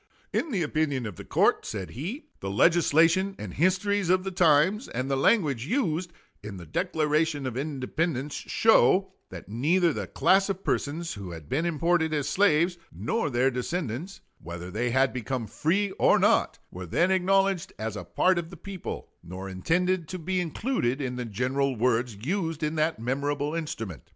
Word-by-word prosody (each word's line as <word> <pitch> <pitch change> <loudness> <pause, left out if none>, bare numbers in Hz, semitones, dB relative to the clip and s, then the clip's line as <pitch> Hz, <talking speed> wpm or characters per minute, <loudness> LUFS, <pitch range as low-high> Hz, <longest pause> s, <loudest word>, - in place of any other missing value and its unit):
In 325 - 0
the 195 - 0
opinion 150 -4 -1
of 105 -5 -6
the - - -8
court - - +2
[said 95 -6 -5
he] 185 - -6
the 95 - -4
legislation 165 - +3
and 95 -4 -7
histories 185 +3 +1
of 185 0 +3
the 190 - -3
times, 175 - +3
and 130 +3 -3
the - - +2
language 140 - +2
used 175 - -1 0.3
in 105 -2 -7
the 85 - -9
Declaration 150 - 0
of 130 -3 -3
Independence, 140 +1 -2
show, - - +3 0.2
that - - -9
neither 160 - +2
the - - -4
class 195 +1 +3
of 195 0 -3
persons 165 +4 -2
who 100 -3 -7
had 80 -3 -10
been 155 +6 0
imported 165 0 +1
as 145 -2 -1
slaves, 175 -2 +2
nor 225 -9 -2
their 130 +1 +2
descendants, 150 - -4 0.2
whether 85 +1 -7
they 120 +5 -1
had 130 +2 +2
become 125 -1 -3
free 190 - 0
or - - +5
not, - - +2
were 90 0 -7
then 175 - +2
acknowledged 195 -1 +2
as 110 -1 -4
a - - -5
part 185 -1 +2
of 165 -1 -6
the 175 - -11
people, 190 +1 -7
nor 90 +3 -8
intended 170 - 0
to 185 - -5
be 185 +2 -1
included 165 - -1
in 130 -3 -3
the 125 -1 -4
general 130 +5 -1
words 120 0 +1
used 165 - -2
in 150 +1 0
that 160 +1 0
memorable 140 +4 -1
instrument. 115 - -4
155 Hz, 175 wpm, -27 LUFS, 125-180 Hz, 0.3 s, or